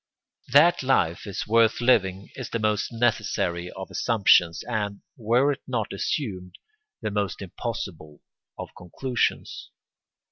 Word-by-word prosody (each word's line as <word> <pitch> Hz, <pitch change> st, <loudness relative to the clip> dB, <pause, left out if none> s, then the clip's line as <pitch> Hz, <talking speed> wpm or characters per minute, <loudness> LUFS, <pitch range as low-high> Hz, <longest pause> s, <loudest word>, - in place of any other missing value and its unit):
That 155 Hz, +6 st, +6 dB
life 105 Hz, -10 st, +1 dB
is 100 Hz, -, -4 dB
worth 115 Hz, +1 st, +3 dB
living 100 Hz, -6 st, +2 dB
is 130 Hz, -4 st, -7 dB
the -, -, -2 dB
most 105 Hz, -1 st, 0 dB
necessary 90 Hz, -7 st, 0 dB
of 95 Hz, +1 st, -9 dB
assumptions 95 Hz, -7 st, +3 dB
and, 105 Hz, -4 st, -3 dB
were 120 Hz, +5 st, +2 dB
it 140 Hz, -, -5 dB
not 115 Hz, -6 st, -2 dB
assumed, 95 Hz, -, -3 dB, 0.5 s
the 105 Hz, -, -2 dB
most 100 Hz, -2 st, -2 dB
impossible 95 Hz, -6 st, -6 dB, 0.4 s
of -, -, -7 dB
conclusions. 120 Hz, +8 st, -3 dB
105 Hz, 120 wpm, -25 LUFS, 95-120 Hz, 0.5 s, That